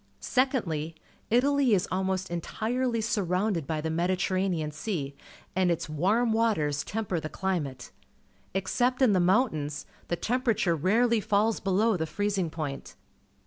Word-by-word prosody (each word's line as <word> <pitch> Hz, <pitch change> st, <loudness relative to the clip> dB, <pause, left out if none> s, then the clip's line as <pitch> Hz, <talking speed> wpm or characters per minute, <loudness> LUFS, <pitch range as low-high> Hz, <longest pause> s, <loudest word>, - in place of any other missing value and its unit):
Secondly, 180 Hz, -, 0 dB, 0.3 s
Italy 265 Hz, 0 st, +4 dB
is 180 Hz, -, 0 dB
almost 190 Hz, -1 st, -1 dB
entire 225 Hz, +9 st, -1 dB
\y 230 Hz, -1 st, -1 dB
surrounded 195 Hz, -, 0 dB
by 155 Hz, -1 st, -1 dB
the 160 Hz, +1 st, -2 dB
JMediterranean 180 Hz, -2 st, 0 dB
Sea, 155 Hz, -5 st, -3 dB, 0.4 s
and 185 Hz, -1 st, +3 dB
its 170 Hz, -1 st, -1 dB
warm 205 Hz, +10 st, +1 dB
waters 155 Hz, -11 st, +1 dB
temper 205 Hz, -5 st, -2 dB
the 155 Hz, -, -5 dB
climate. 150 Hz, -11 st, -3 dB, 0.6 s
Except 245 Hz, +7 st, +1 dB
in 230 Hz, -5 st, +5 dB
the 185 Hz, -, +3 dB
mountains, 175 Hz, -, +1 dB, 0.2 s
the 175 Hz, -, 0 dB
temperature 230 Hz, -4 st, +1 dB
rarely 225 Hz, +8 st, +3 dB
falls 210 Hz, +2 st, +1 dB
below 205 Hz, +2 st, +2 dB
the 160 Hz, -1 st, -2 dB
freezing 200 Hz, -2 st, -1 dB
point. 155 Hz, -4 st, -5 dB
190 Hz, 135 wpm, -28 LUFS, 160-225 Hz, 0.6 s, in